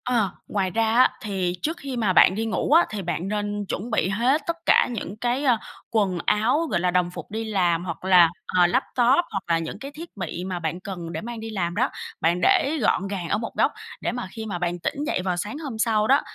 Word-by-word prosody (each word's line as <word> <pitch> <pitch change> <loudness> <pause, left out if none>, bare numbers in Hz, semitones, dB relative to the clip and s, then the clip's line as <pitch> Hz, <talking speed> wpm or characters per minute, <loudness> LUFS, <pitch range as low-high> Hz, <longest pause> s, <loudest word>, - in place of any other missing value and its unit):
Ờ, 235 -6 +1 0.2
ngoài 190 -3 -1
ra 225 +3 +1
á, 250 +2 +6
thì 190 -4 -2
trước 320 +3 -2
khi 275 -5 -5
mà 210 -5 +1
bạn 185 - +6
đi 225 +2 -1
ngủ 225 +5 -1
á, 335 +3 +7
thì 210 -2 -4
bạn 175 0 -3
nên 205 0 -2
chuẩn 205 +4 -4
bị 190 -4 +1
hết 245 +10 +2
tất 335 - 0
cả - - +5
những 210 -3 -5
cái, 245 +4 -1
à, 250 -5 +4 0.3
quần 200 -5 +1
áo, 245 +10 +2
gọi - - +2
là, 180 +1 +1
đồng 180 -1 +1
phục - - -9
đi 220 +1 -3
làm 180 -5 +1
hoặc 170 +1 -6
là, 180 -3 +7 0.3
ờ, 175 -1 +6
laptop 255 - +2
hoặc 195 -1 -3
là 170 -1 +3
những 165 +4 -6
cái 275 +4 -7
thiết 325 -3 -11
bị 180 -1 -4
mà 185 -1 -3
bạn 170 +1 -3
cần 185 -4 -6
để - - -4
mang 235 +1 -6
đi 225 0 -6
làm 175 -5 -2
đó, - - +2 0.3
bạn 170 +2 +2
để 285 - +3
gọn 195 -3 +2
gàng 190 -4 -4
ở - - +2
một 225 +1 -4
góc - - +3 0.3
để - - -1
mà 245 -5 -4
khi 225 0 -6
mà 200 -5 -3
bạn 175 0 -2
tỉnh 285 +11 -3
dậy 315 - 0
vào 180 -1 -1
sáng 205 +9 -4
hôm 280 -8 -6
sau 220 -1 +2
đó 275 +2 +5
205 Hz, 250 wpm, -24 LUFS, 180-240 Hz, 0.3 s, á